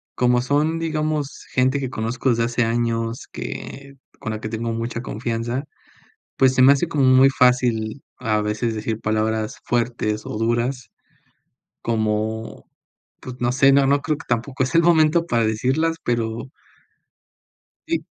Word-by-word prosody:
como 125 Hz, 0 st, +3 dB
son, 150 Hz, +5 st, +1 dB
digamos, 155 Hz, -3 st, -2 dB
gente 130 Hz, +2 st, +2 dB
que 130 Hz, -2 st, -4 dB
conozco 115 Hz, +3 st, -2 dB
desde 115 Hz, -1 st, +2 dB
hace 120 Hz, +1 st, 0 dB
años 115 Hz, 0 st, -1 dB
que, 140 Hz, 0 st, -7 dB, 0.3 s
con 110 Hz, -5 st, -4 dB
la 110 Hz, -, -5 dB
que 110 Hz, -, -4 dB
tengo 115 Hz, +1 st, -3 dB
mucha 115 Hz, +1 st, -3 dB
confianza, 120 Hz, +4 st, -3 dB, 0.7 s
pues, 130 Hz, -1 st, +4 dB
se 130 Hz, -, +4 dB
me 135 Hz, +2 st, +8 dB
hace 140 Hz, +4 st, +2 dB
como 145 Hz, -4 st, 0 dB
muy 130 Hz, +1 st, +6 dB
fácil 125 Hz, -2 st, +2 dB, 0.2 s
a 110 Hz, -4 st, 0 dB
veces 105 Hz, +2 st, -1 dB
decir 110 Hz, 0 st, -3 dB
palabras 110 Hz, 0 st, -1 dB
fuertes 115 Hz, -3 st, -1 dB
o 105 Hz, -, -5 dB
duras, 120 Hz, +2 st, -1 dB, 0.9 s
como, 110 Hz, 0 st, -2 dB, 0.5 s
pues, 125 Hz, -, -8 dB
no 120 Hz, 0 st, +1 dB
sé, 135 Hz, +2 st, +5 dB
no 140 Hz, 0 st, +4 dB
no 140 Hz, +1 st, +2 dB
creo 155 Hz, -1 st, -1 dB
que 160 Hz, -, -12 dB
tampoco 125 Hz, +3 st, -1 dB
es 130 Hz, -, -3 dB
el 165 Hz, -, +6 dB
momento 165 Hz, 0 st, +4 dB
para 115 Hz, -5 st, +1 dB
decirlas 135 Hz, +9 st, 0 dB
pero 115 Hz, 0 st, -2 dB, 1.4 s
Sí. -, -, -1 dB
120 Hz, 150 wpm, -22 LUFS, 115-135 Hz, 1.4 s, me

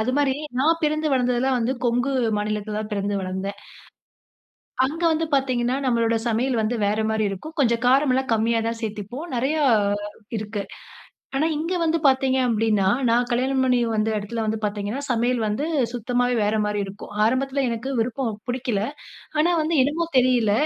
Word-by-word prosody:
அது 225 Hz, +4 st, 0 dB
மாரி 285 Hz, -2 st, +3 dB, 0.3 s
நான் 325 Hz, +4 st, +3 dB
பிறந்து 310 Hz, +1 st, +1 dB
வளர்ந்தது 250 Hz, -2 st, +2 dB
எல்லாம் 260 Hz, -1 st, +2 dB
வந்து, 235 Hz, +2 st, 0 dB
கொங்கு 245 Hz, +3 st, +1 dB, 0.3 s
மாநிலத்துல 210 Hz, 0 st, -2 dB
தான் 215 Hz, 0 st, -5 dB
பிறந்து 200 Hz, 0 st, -1 dB
வளந்தேன். 190 Hz, +2 st, -4 dB, 1.3 s
அங்க 315 Hz, +6 st, -4 dB
வந்து 320 Hz, +1 st, 0 dB
பாத்தீங்கனா, 255 Hz, -2 st, +1 dB
நம்ளுடைய 230 Hz, -2 st, +2 dB
சமையல் 235 Hz, +1 st, +1 dB
வந்து 220 Hz, +3 st, 0 dB
வேற 210 Hz, +2 st, 0 dB
மாரி 220 Hz, 0 st, 0 dB
இருக்கும். 250 Hz, -, -7 dB
கொஞ்சம் 235 Hz, -2 st, +2 dB
காரம் 270 Hz, +2 st, +4 dB
எல்லாம் 265 Hz, -1 st, 0 dB
கம்மியா 230 Hz, +1 st, +2 dB
தான் 230 Hz, 0 st, -3 dB
சேத்துப்போம், 220 Hz, -, -5 dB
நிறையா 295 Hz, +6 st, +1 dB, 0.7 s
இருக்கு. 210 Hz, -1 st, -4 dB, 0.7 s
ஆனா, 295 Hz, -, +2 dB
இங்கு 335 Hz, +4 st, -2 dB
வந்து 325 Hz, 0 st, +2 dB
பாத்தீங்க 265 Hz, 0 st, +3 dB
அப்படினா, 215 Hz, -3 st, +2 dB, 0.2 s
நான் 240 Hz, +1 st, +2 dB
கல்யாணம் 260 Hz, +2 st, +1 dB
பண்ணி 250 Hz, -1 st, +3 dB, 0.2 s
வந்த 215 Hz, +1 st, +1 dB
இடத்துல 220 Hz, +3 st, -3 dB
வந்து 220 Hz, 0 st, -1 dB
பாத்தீங்கனா, 205 Hz, +4 st, -3 dB
சமையல் 240 Hz, +1 st, +1 dB
வந்து 215 Hz, +9 st, -1 dB, 0.3 s
சுத்தமாவே 245 Hz, +1 st, 0 dB
வேற 210 Hz, +1 st, +1 dB
மாரி 210 Hz, 0 st, -1 dB
இருக்கும், 200 Hz, +2 st, -10 dB
ஆரம்பத்ல 270 Hz, +3 st, 0 dB
எனக்கு 235 Hz, +3 st, -3 dB
விருப்பம், 240 Hz, +1 st, -1 dB, 0.2 s
பிடிக்கல. 245 Hz, -4 st, -1 dB, 0.6 s
ஆனா, 310 Hz, +3 st, +3 dB
வந்து 315 Hz, +1 st, 0 dB
என்னமோ 315 Hz, +5 st, -1 dB
தெரியல, 250 Hz, -4 st, +3 dB
240 Hz, 160 wpm, -23 LUFS, 215-265 Hz, 1.3 s, காரம்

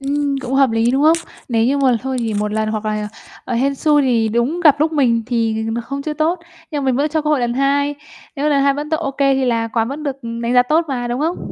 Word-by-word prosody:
Ừm, 280 Hz, 0 st, -1 dB
cũng 260 Hz, 0 st, -4 dB
hợp 270 Hz, -2 st, +4 dB
lý, 225 Hz, +1 st, +2 dB
đúng 270 Hz, +3 st, +1 dB
không? 320 Hz, +2 st, +5 dB, 0.3 s
Nếu 225 Hz, -2 st, +1 dB
như 275 Hz, +4 st, +1 dB
mà 260 Hz, -3 st, +3 dB
thôi 265 Hz, 0 st, -3 dB
thì 225 Hz, -3 st, -2 dB
một 210 Hz, 0 st, -1 dB
lần 215 Hz, 0 st, -1 dB
hoặc 215 Hz, 0 st, -3 dB
là, 210 Hz, -1 st, -2 dB, 0.4 s
ờ, 250 Hz, -, -3 dB
hên 270 Hz, +4 st, +1 dB
xui 295 Hz, +1 st, +2 dB
thì 235 Hz, -4 st, +2 dB
đúng 235 Hz, +10 st, 0 dB
gặp 295 Hz, -4 st, +5 dB
lúc 315 Hz, +1 st, +2 dB
mình 245 Hz, -6 st, +2 dB
thì, 225 Hz, -2 st, -1 dB
ờ, -, -, -1 dB
không 275 Hz, +3 st, -5 dB
chưa 305 Hz, -, -3 dB
tốt, 320 Hz, +4 st, 0 dB, 0.3 s
nhưng 290 Hz, -2 st, -3 dB
mình 260 Hz, -2 st, +1 dB
vẫn 290 Hz, +3 st, +1 dB
cho 310 Hz, 0 st, -1 dB
cơ 300 Hz, -, -1 dB
hội 295 Hz, -3 st, +2 dB
lần 240 Hz, 0 st, -1 dB
hai. 280 Hz, +2 st, +1 dB, 0.4 s
Nếu 290 Hz, +2 st, 0 dB
lần 280 Hz, -2 st, +2 dB
hai 280 Hz, 0 st, +3 dB
vẫn 295 Hz, +2 st, -5 dB
t -, -, -12 dB
OK 295 Hz, -4 st, -3 dB
thì 270 Hz, -1 st, +2 dB
là 230 Hz, -2 st, 0 dB
quán 225 Hz, 0 st, -1 dB
vẫn 285 Hz, +3 st, -6 dB
được, 275 Hz, -2 st, -4 dB
ừm, 230 Hz, 0 st, -5 dB
đánh 235 Hz, +1 st, -1 dB
giá 245 Hz, -, +6 dB
tốt 310 Hz, +7 st, +1 dB
mà, 245 Hz, -3 st, -3 dB
đúng 240 Hz, +2 st, -2 dB
hông? 330 Hz, +4 st, 0 dB
270 Hz, 280 wpm, -18 LUFS, 235-290 Hz, 0.4 s, giá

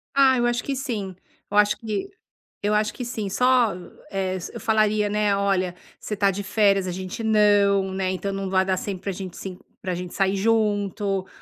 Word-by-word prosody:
Ah, 270 Hz, -2 st, +5 dB
eu 240 Hz, -, +2 dB
acho 240 Hz, 0 st, 0 dB
que 275 Hz, -, -2 dB
sim, 215 Hz, -8 st, -4 dB, 0.3 s
eu 205 Hz, -, -1 dB
acho 210 Hz, 0 st, +5 dB
que 220 Hz, -, -3 dB, 0.6 s
eu 205 Hz, +1 st, +1 dB
acho 210 Hz, 0 st, +2 dB
que 250 Hz, -, -5 dB
sim, 220 Hz, -4 st, -3 dB
só, 250 Hz, -1 st, +3 dB, 0.4 s
eh, 190 Hz, -1 st, -1 dB
eu -, -, -7 dB
falaria, 215 Hz, -2 st, +2 dB
né: 210 Hz, -1 st, +1 dB
"Olha, 190 Hz, -3 st, 0 dB, 0.2 s
você 210 Hz, -, -4 dB
está 200 Hz, -1 st, +3 dB
de 200 Hz, +2 st, -4 dB
férias, 195 Hz, -1 st, +2 dB
a -, -, -2 dB
gente 185 Hz, +4 st, -5 dB
não, 205 Hz, -3 st, +3 dB
né, 190 Hz, -1 st, -1 dB
então 195 Hz, +1 st, -3 dB
não 195 Hz, -1 st, -3 dB
vai 190 Hz, 0 st, +2 dB
dar 190 Hz, -1 st, +1 dB
sempre 190 Hz, -1 st, -5 dB
para 200 Hz, -, -2 dB
gente 185 Hz, -1 st, -7 dB
sim 185 Hz, -1 st, -7 dB, 0.2 s
para 185 Hz, -, -2 dB
gente 180 Hz, 0 st, -6 dB
sair 195 Hz, 0 st, +2 dB
junto, 205 Hz, -2 st, 0 dB
200 Hz, 200 wpm, -24 LUFS, 190-215 Hz, 0.6 s, Ah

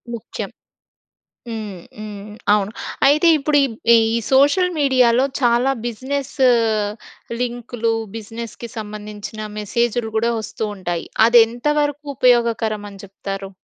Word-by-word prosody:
ముఖ్యం. 225 Hz, -, -6 dB, 1.0 s
హ్మ్. 210 Hz, -6 st, -6 dB, 0.2 s
హ్మ్. 210 Hz, -1 st, -8 dB, 0.2 s
అవును. 205 Hz, -1 st, +1 dB, 0.4 s
అయితే, 300 Hz, +4 st, +4 dB
ఇప్పుడు 290 Hz, +1 st, +1 dB
ఇబ్ 235 Hz, -5 st, -6 dB, 0.2 s
ఈ -, -, +7 dB, 0.4 s
సోషల్ 290 Hz, +7 st, +4 dB
మీడియాలో 255 Hz, -2 st, +4 dB, 0.2 s
చాలా 240 Hz, +2 st, +3 dB
బిజినెస్ 260 Hz, +4 st, -4 dB, 1.1 s
లింకులు 240 Hz, -1 st, -2 dB, 0.2 s
బిజినెస్‌కి 225 Hz, +1 st, -7 dB
సంబంధించిన 210 Hz, 0 st, -7 dB, 0.2 s
మెసేజ్‌లు 235 Hz, +2 st, -1 dB
గూడా 230 Hz, +2 st, +2 dB
వస్తూ 215 Hz, +1 st, -6 dB
ఉంటాయి. 175 Hz, -3 st, -3 dB, 0.2 s
అది 235 Hz, +1 st, +7 dB
ఎంతవరకు 290 Hz, +4 st, -1 dB
ఉపయోగకరం 230 Hz, -4 st, +2 dB
అని 195 Hz, -1 st, -12 dB
చెప్తారు? 195 Hz, 0 st, -6 dB
235 Hz, 105 wpm, -20 LUFS, 210-255 Hz, 1.1 s, ఈ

